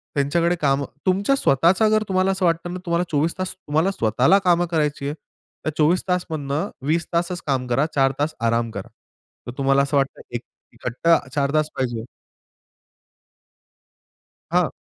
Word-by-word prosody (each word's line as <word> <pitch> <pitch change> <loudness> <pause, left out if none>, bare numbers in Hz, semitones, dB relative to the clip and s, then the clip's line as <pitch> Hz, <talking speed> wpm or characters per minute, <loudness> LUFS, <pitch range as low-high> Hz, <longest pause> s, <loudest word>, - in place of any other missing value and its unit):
त्यांच्याकडे 170 +5 +1
काम 140 -1 +2 0.2
तुमच्या 200 +8 +2
स्वतःचा 180 - +3
जर 215 0 +2
तुम्हाला 190 0 +2
असं 190 -1 0
वाटतं 170 +1 0
ना 185 - -5
तुम्हाला 170 +1 +1
24 155 +4 0
तास 185 0 -3
तुम्हाला 165 +2 0
स्वतःला 125 - +3
कामं 175 0 +4
करायची 150 -3 0
आहे 145 - -2 0.5
तर - - +1
24 160 +4 +3
तास 180 0 0
मधनं 150 +4 -2 0.2
20 165 +1 +1
तासच 175 +1 -1
काम 130 -2 0
करा, 135 +5 +2
4 135 -1 +4
तास 155 +2 0
आराम 115 0 +1
करा. 100 -3 -7 0.6
तर - - -4
तुम्हाला 135 0 +3
असं 140 +1 0
वाटतं 135 0 -1
एक 120 - -2 0.3
इकट्टा 130 +8 +2 0.2
4 140 0 0
तास 155 0 +2
पाहिजे 120 -3 -2 2.5
हां. - - +3
155 Hz, 155 wpm, -22 LUFS, 135-175 Hz, 2.5 s, कामं